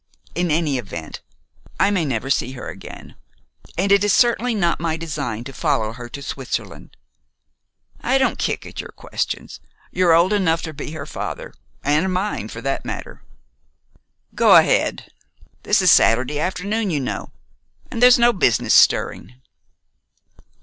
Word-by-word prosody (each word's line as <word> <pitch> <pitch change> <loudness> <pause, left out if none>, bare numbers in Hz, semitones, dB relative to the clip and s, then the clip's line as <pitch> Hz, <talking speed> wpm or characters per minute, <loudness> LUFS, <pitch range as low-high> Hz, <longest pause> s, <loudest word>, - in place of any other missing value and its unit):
In 175 0 -1
any 150 -4 +1
event, 85 -8 -8 0.6
I 195 +2 +3
may 185 -5 0
never 135 0 -2
see 130 -1 0
her 130 - -8
again, - - -11 0.6
and 195 +3 +1
it 200 0 +5
is 205 - +2
certainly 240 0 +3
not 175 -5 +1
my 160 -1 -1
design 140 -9 -4
to 135 +2 -9
follow 130 -9 -1
her 120 0 -9
to 140 +3 -8
Switzerland. 135 -1 -6 1.0
I 260 +3 +2
don't 265 - +1
kick - - -2
at - - -6
your - - -11
questions. - - -4 0.3
You're 175 -2 +4
old 175 +5 +3
enough 165 -5 +1
to 160 - -5
be 150 +1 -7
her 150 -3 -6
father, - - -6 0.3
and 155 +6 +1
mine, 185 - -2
for 115 - -8
that 135 +2 -2
matter. - - -7 1.1
Go - - +5
ahead. - - +3 0.5
This - - +2
is - - +6
Saturday 130 +6 +3
afternoon, 200 +5 -2
you 155 -4 0
know, 130 - -4 0.6
and 230 - -4
there's 250 0 +8
no 240 0 +4
business 125 - +2
stirring." 125 - +3
160 Hz, 150 wpm, -21 LUFS, 135-195 Hz, 1.1 s, there's